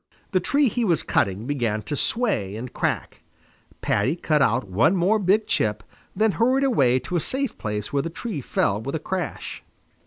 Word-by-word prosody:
The 185 - +3
tree 280 +10 +2
he 240 +2 -1
was 175 -8 +2
cutting 100 +3 0
began 120 -6 -1
to 145 - -3
sway 145 - 0
and 120 +3 -7
crack. - - -2 0.6
Paddy 135 +6 +1
cut 155 -4 +1
out 125 -3 +2
one 105 - +3
more 190 +5 +3
big 205 +3 +2
chip, 105 -1 0 0.3
then 220 0 +3
hurried 255 +6 +2
away 135 - +3
to 175 +7 -2
a - - +2
safe 265 - -2
place 105 0 -4
while 140 - +2
the 165 - -4
tree 170 - -5
fell 105 -4 0
with 140 +5 -4
a - - -1
crash. 180 +1 -4
155 Hz, 185 wpm, -24 LUFS, -, 0.6 s, The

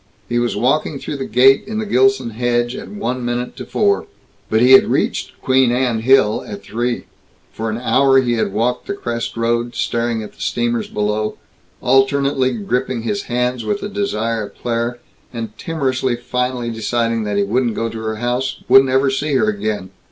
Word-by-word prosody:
He 120 0 0
was 120 0 0
walking 140 +3 +1
through 145 - -5
the 135 - -4
gate 130 +4 +5
in 215 0 -4
the 220 - -2
Gilson 130 - +2
hedge 120 +2 0
at - - -7
one 130 -12 -3
minute 120 +1 -3
to - - -7
four. 100 -1 +1 0.4
But 110 - +2
he 125 +3 +5
had 130 - +8
reached - - -1
Queen 130 -2 +3
Anne 125 -2 +1
Hill 115 -2 +3
at 100 -1 -8
three. 120 +4 -2 0.5
For 110 0 -3
an 110 - -2
hour 135 +2 +4
he 120 -2 +1
had 110 -4 0
walked 120 +5 -1
the 200 - -2
crest 120 -10 -4
road, 120 +1 0
staring 115 -1 -1
at 105 - -10
the - - -16
steamers 120 -1 -1
below, 105 +1 -2 0.4
alternately 135 0 +2
gripping 120 +2 -2
his 200 - -2
hands 125 0 0
with 205 - -2
desire 115 - -1
of - - -19
Claire, 120 0 -2 0.3
and 115 -3 -6
timorously 130 -6 -1
finally 125 0 -2
deciding 115 0 -1
that 105 -1 -1
he 100 - +3
wouldn't 115 +3 0
go 115 - -1
to 115 0 -6
her 110 0 -3
house 125 +3 -2
wouldn't 135 0 +6
ever 135 +1 +3
see 145 +2 -1
her 110 -4 +3
again. 105 -2 -3
120 Hz, 185 wpm, -18 LUFS, 115-130 Hz, 0.5 s, had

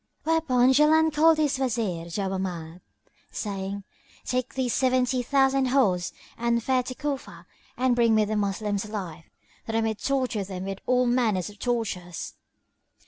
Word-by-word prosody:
Whereupon 265 -6 +3
Jaland 310 +2 +4
called 320 +1 +5
his 295 -3 +1
Wazir 220 -10 -1
Jawámard,[FN#13] 185 -2 -4 0.5
saying, 200 -1 -4 0.4
"Take 255 +1 -2
thee 260 -1 0
seventy 255 0 +1
thousand 270 +1 +2
horse 205 -10 +2 0.3
and 235 0 +1
fare 260 0 +2
to 255 +1 -7
Cufa 285 -1 -5 0.3
and 255 -1 +2
bring 230 -2 +4
me 215 -1 +4
the 215 +1 -2
Moslems 205 0 -1
alive, 180 -7 -6 0.4
that 225 - -3
I 225 - +2
may 220 0 0
torture 255 -2 -1
them 185 -1 -6
with 195 0 -5
all 250 0 +3
manner 240 -6 +2
of 205 +3 -9
tortures." 200 -8 -3
235 Hz, 145 wpm, -26 LUFS, 195-260 Hz, 0.5 s, called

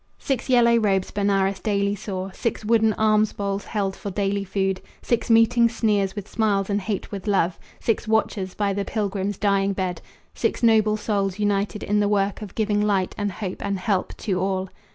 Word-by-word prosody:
Six 265 -1 -2
yellow 235 -2 +5
robes 195 -4 +1
Benares 200 -1 +1
daily 200 -2 0
saw, 195 -2 -5
Six 220 +2 -3
wooden 220 -1 +3
alms 215 0 +2
bowls 200 0 -3
held 195 -3 -2
for 200 - -6
daily 200 +1 -1
food, 190 -1 -1 0.2
Six 235 0 0
meeting 230 +1 +5
sneers 210 -4 0
with 205 -1 -6
smiles 205 -3 0
and 200 0 0
hate 200 0 -4
with 200 0 -6
love, 185 -4 +1 0.2
Six 225 0 -1
watchers 210 -4 0
by 200 -1 0
the 200 +1 -1
pilgrim's 200 -2 -2
dying 200 -1 +1
bed, 185 -3 -3 0.3
Six - - -1
noble 215 -2 +4
souls 200 -3 -1
united 205 0 0
in 210 +1 +1
the 205 -1 +2
work 200 0 0
Of 210 -3 -8
giving 210 -2 +1
light 200 -3 +1
and 205 -1 -2
hope 185 0 -5
and 200 -1 -1
help 185 0 -1
to 190 -4 0
all. 190 0 -1
205 Hz, 185 wpm, -23 LUFS, 195-215 Hz, 0.3 s, yellow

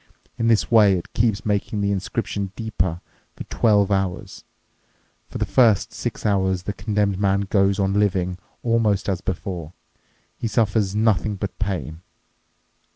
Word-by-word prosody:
In 115 - -1
this 115 0 +2
way 105 -4 +6
it 85 - -8
keeps 110 -2 +1
making 105 0 -1
the 100 0 +1
inscription 100 -1 -3
deeper 90 -6 -2 0.3
for - - -7
twelve 105 -3 +2
hours. 95 -2 -2 0.9
For - - -6
the - - 0
first 115 -6 +3
six - - -5
hours 95 -3 +1
the 100 - -3
condemned 100 -1 -1
man 100 -1 +2
goes 100 0 +2
on 100 -1 +1
living 95 -3 0 0.2
almost 115 -4 +1
as 95 -3 -1
before. 90 -3 -5 0.7
He 115 - -1
suffers 105 -3 +1
nothing 105 -1 +1
but 100 0 -6
pain. 85 -6 -3
100 Hz, 145 wpm, -22 LUFS, 95-105 Hz, 0.9 s, way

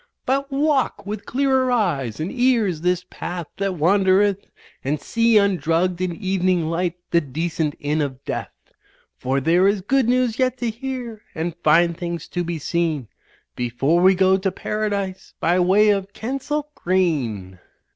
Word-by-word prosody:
But 275 +2 0
walk 280 -5 +1
with 205 0 -6
clearer 265 -1 +2
eyes 145 - 0
and 160 +4 -3
ears 235 -10 +1
this 180 +1 0
path 175 -1 -5
that 195 -1 -1
wander 190 +3 +3
eth. 200 -1 0 0.4
And 145 +3 -1
see 230 +8 +2
undrugged 180 -2 +1
in 180 -2 -1
evening 185 -3 0
light 175 0 -1 0.2
the 170 - +4
decent 155 +1 -2
inn 150 +2 -1
of 135 -2 -4
death; - - -6 0.5
For 130 +2 0
there 170 +7 +3
is 200 -1 +1
good 260 +4 +1
news 250 -1 +1
yet 255 -1 +1
to 240 -2 -2
hear 240 -2 -6
and 165 +1 -3
fine 170 +3 +4
things 170 -1 -5
to 175 - -2
be 170 -1 -3
seen 155 -5 -1 0.5
Before 135 +8 +1
we 190 +1 +6
go 190 +1 +4
to 190 0 -1
Paradise 200 -1 -3
by 175 +3 +2
way 195 +4 +4
of 200 0 -2
Kensal 275 +6 -3
Green." 130 - -1
185 Hz, 155 wpm, -22 LUFS, 165-220 Hz, 0.5 s, we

